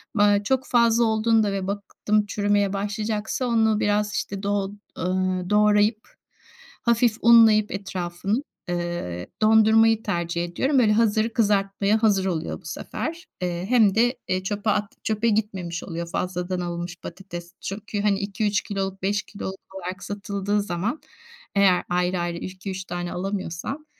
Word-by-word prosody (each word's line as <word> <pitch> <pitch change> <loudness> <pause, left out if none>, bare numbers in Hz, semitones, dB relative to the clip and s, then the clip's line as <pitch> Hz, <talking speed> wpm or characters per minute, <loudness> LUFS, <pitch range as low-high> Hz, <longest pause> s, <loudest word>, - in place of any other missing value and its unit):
M 205 - +4
aaa, 205 0 +4
çok 260 +4 0
fazla 235 -1 +4
olduğunda 220 -1 +2
ve 195 -1 -3
baktım 205 +1 -1
çürümeye 205 -1 +1
başlayacaksa 210 +4 -2
onu 220 -3 +2
biraz, 210 0 +1
işte, 195 0 -3
doğ 200 -1 0 0.3
ııı, 185 0 -1
doğrayıp, 210 +1 +3 0.7
hafif 235 -2 +2
unlayıp 225 -2 +6
etrafını, 195 +4 -3 0.3
eee, 175 - -3
dondurmayı 220 +1 +5
tercih 170 -3 -1
ediyorum. 265 - +1
Böyle, 215 -4 +4
hazır 220 0 +2
kızartmaya 205 -1 +1
hazır 200 -3 +3
oluyor 170 -4 -2
bu - - -23
sefer. 335 +3 -5
Eee, 175 0 -2
hem 220 -6 +4
de, 240 +3 +3
eee, 185 0 0
çöpe 205 +2 -2
at 210 -1 0
çöpe 220 +1 0
gitmemiş 190 -5 -2
oluyor 170 -1 -5
fazladan 180 0 -2
alınmış 175 0 -4
patates. 175 -1 -8
Çünkü 205 +1 -4
hani 200 -1 +2
2-3 205 +1 0
kiloluk, 195 -2 -4
5 200 +2 0
kiloluk 190 -1 -8
olarak 185 +1 -6
satıldığı 205 0 -2
zaman 200 - -3 0.5
eğer 195 -3 +4
ayrı 180 +1 +1
ayrı 175 0 -2
2-3 185 +1 -6
tane 175 0 -4
alamıyorsam 195 - -4
200 Hz, 140 wpm, -24 LUFS, 185-215 Hz, 0.7 s, unlayıp